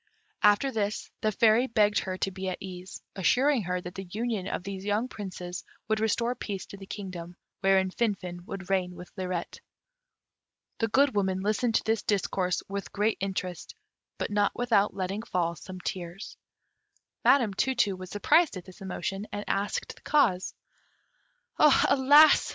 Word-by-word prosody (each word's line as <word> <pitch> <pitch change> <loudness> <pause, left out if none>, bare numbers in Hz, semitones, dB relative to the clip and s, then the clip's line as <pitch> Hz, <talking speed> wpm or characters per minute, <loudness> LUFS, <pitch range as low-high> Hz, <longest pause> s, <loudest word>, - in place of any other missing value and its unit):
After 210 +6 +4
this 210 -3 -2
the 215 - +2
Fairy 225 +4 +4
begged 210 -3 +3
her 185 -1 -4
to 195 - -1
be 190 0 -4
at 185 - -3
ease, 185 -1 -8
assuring 250 +7 +3
her 180 +1 -1
that 180 0 -8
the 195 0 -6
union 215 -1 -2
of 180 - -3
these 195 0 -6
young 210 +4 0
Princes 180 -5 -6 0.2
would 220 0 +1
restore 235 +2 +1
peace 200 -6 -5
to 200 - -11
the 195 -1 -11
kingdom, 180 -4 -7 0.2
wherein 190 -1 +3
Finfin 185 -6 -2
would 195 -2 -6
reign 180 -2 0
with 180 - -11
Lirette. 185 -3 -4 1.2
The 225 - +2
Good 270 +5 +3
Woman 190 -2 0
listened 215 +3 +1
to - - +3
this 225 0 +1
discourse 185 -3 0
with 200 0 -5
great 210 +2 0
interest; 185 -3 -4 0.4
but - - -3
not 205 0 +2
without 225 -4 +2
letting 195 +2 -2
fall 175 -6 -1
some 185 +3 -9
tears. 180 +2 -6 0.9
Madam 240 -7 +4
Tu 265 +7 0
tu 205 -5 +2
was 185 0 -9
surprised 250 - +3
at 180 - -9
this 185 0 -14
emotion, 195 +2 -4
and 205 0 -4
asked 200 +1 -1
the - - -19
cause. 215 -12 +2 1.0
"Alas!" 290 +1 +6
200 Hz, 160 wpm, -28 LUFS, 185-220 Hz, 1.2 s, Alas